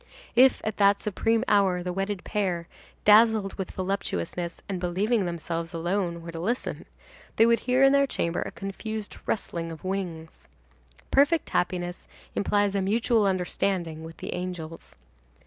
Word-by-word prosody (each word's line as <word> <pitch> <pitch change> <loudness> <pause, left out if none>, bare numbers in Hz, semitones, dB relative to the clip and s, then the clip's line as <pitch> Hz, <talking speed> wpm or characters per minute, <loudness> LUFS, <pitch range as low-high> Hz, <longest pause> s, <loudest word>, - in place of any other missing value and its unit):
If 260 +2 +6
at 215 -1 -3
that 200 0 +4
supreme 225 +2 +1
hour, 190 -3 +3
the 180 0 -3
wedded 195 0 -2
pair, 185 -5 -1 0.4
dazzled 215 -1 +5
with 190 - -5
voluptuousness 180 - -3
and 195 -2 -3
believing 195 +5 +1
themselves 170 0 -4
alone, 170 0 -1
were 170 - -7
to 165 - -6
listen, 230 +9 -3 0.5
they 225 - +6
would 235 0 +4
hear 255 +2 +2
in 270 0 +6
their 280 0 +4
chamber 170 -8 -1
a - - -3
confused 210 +2 -6
rustling 170 -5 -2
of 160 - -10
wings. 180 -4 -5 0.6
Perfect 290 +4 +3
happiness 175 0 -1 0.3
implies 205 0 +1
a 200 - +1
mutual 220 +2 +2
understanding 180 -3 -1
with 165 0 -10
the - - -5
angels. 175 -3 -6
195 Hz, 145 wpm, -27 LUFS, 175-215 Hz, 0.6 s, If